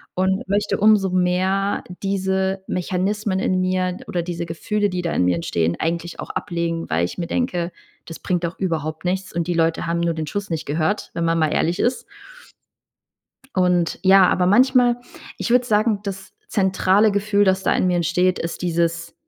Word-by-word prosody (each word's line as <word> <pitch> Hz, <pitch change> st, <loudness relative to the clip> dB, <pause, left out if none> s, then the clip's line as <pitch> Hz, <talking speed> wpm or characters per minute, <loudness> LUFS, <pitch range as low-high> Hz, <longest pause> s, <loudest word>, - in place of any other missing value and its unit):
und 190 Hz, +1 st, 0 dB
möchte 205 Hz, +1 st, 0 dB
umso 210 Hz, -2 st, +4 dB
mehr 185 Hz, +2 st, +1 dB, 0.2 s
diese 190 Hz, 0 st, -1 dB
Mechanismen 190 Hz, +2 st, -1 dB
in 185 Hz, -1 st, +1 dB
mir 185 Hz, 0 st, 0 dB
oder 175 Hz, -1 st, -2 dB
diese 170 Hz, 0 st, -4 dB
Gefühle, 205 Hz, +5 st, -1 dB
die 180 Hz, -1 st, -3 dB
da 170 Hz, -, -1 dB
in 90 Hz, -, +2 dB
mir 90 Hz, -1 st, +2 dB
entstehen, 85 Hz, 0 st, -1 dB
eigentlich 170 Hz, +1 st, -3 dB
auch -, -, -6 dB
ablegen, 170 Hz, -1 st, -3 dB
weil 80 Hz, +2 st, +1 dB
ich 90 Hz, -, -7 dB
mir 170 Hz, -, -3 dB
denke: 180 Hz, -9 st, -1 dB, 0.3 s
„Das 165 Hz, -, -8 dB
bringt 180 Hz, -1 st, -1 dB
doch 170 Hz, +1 st, -3 dB
überhaupt 160 Hz, -3 st, -3 dB
nichts.“ 185 Hz, +1 st, -2 dB
Und 170 Hz, -1 st, -1 dB
die 175 Hz, -, 0 dB
Leute 165 Hz, 0 st, +1 dB
haben 170 Hz, 0 st, 0 dB
nur 170 Hz, -1 st, +1 dB
den 160 Hz, -1 st, -3 dB
Schuss 200 Hz, +5 st, -4 dB
nicht 165 Hz, -2 st, -3 dB
gehört, 160 Hz, +7 st, -1 dB
wenn 170 Hz, -, -2 dB
man 165 Hz, 0 st, +1 dB
mal 155 Hz, -1 st, +1 dB
ehrlich 175 Hz, +3 st, 0 dB
ist. 250 Hz, +1 st, 0 dB, 1.5 s
Und 180 Hz, -2 st, +1 dB
ja, 190 Hz, -1 st, +7 dB
aber 180 Hz, -, +2 dB
manchmal 245 Hz, +4 st, +4 dB, 0.4 s
ich -, -, -3 dB
würde 250 Hz, +1 st, +4 dB
sagen, 215 Hz, -2 st, +1 dB
das 195 Hz, -2 st, -7 dB, 0.2 s
zentrale 195 Hz, +1 st, +3 dB
Gefühl, 205 Hz, 0 st, +2 dB
das 190 Hz, 0 st, +2 dB
da -, -, +2 dB
in -, -, +1 dB
mir 180 Hz, -, +1 dB
entsteht, 175 Hz, +2 st, +1 dB
ist 165 Hz, -, -5 dB
dieses 170 Hz, -1 st, -1 dB
185 Hz, 185 wpm, -21 LUFS, 170-195 Hz, 1.5 s, ja